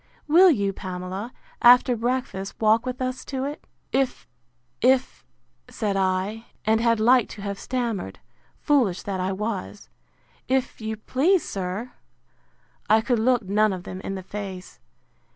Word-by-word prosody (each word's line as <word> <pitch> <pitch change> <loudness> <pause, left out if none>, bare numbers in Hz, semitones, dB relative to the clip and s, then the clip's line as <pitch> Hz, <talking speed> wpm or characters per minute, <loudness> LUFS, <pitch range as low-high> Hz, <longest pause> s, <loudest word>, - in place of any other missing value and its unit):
Will 350 +5 +7
you, 200 - +1
Pamela, 185 +4 -6 0.3
after 245 +1 +7
breakfast, 235 -5 -2
walk 220 +3 +3
with 255 0 -3
us 255 0 -3
to 265 -2 -3
it? 290 +2 -6 0.3
If, 265 -1 -1 0.5
if, 260 +1 +2 0.5
said 205 -3 -2
I, 195 +4 -1 0.2
and 220 +1 +3
had 230 -1 +2
like 240 +1 +4
to 200 - -9
have 200 -1 -4
stammered, 230 - -3 0.4
foolish 245 -11 +1
that 195 -2 -3
I 185 +1 -1
was! 205 0 -4 0.6
if 260 -3 -1
you 220 0 -4
please, 305 - +1
sir. 195 +6 -4 1.0
I 220 +1 +5
could 240 0 0
look 245 0 +2
none 210 +2 +2
of 180 -1 -6
them 185 +1 -7
in 195 - -4
the 190 - -6
face. 190 -2 -7
220 Hz, 145 wpm, -24 LUFS, 195-255 Hz, 1.0 s, Will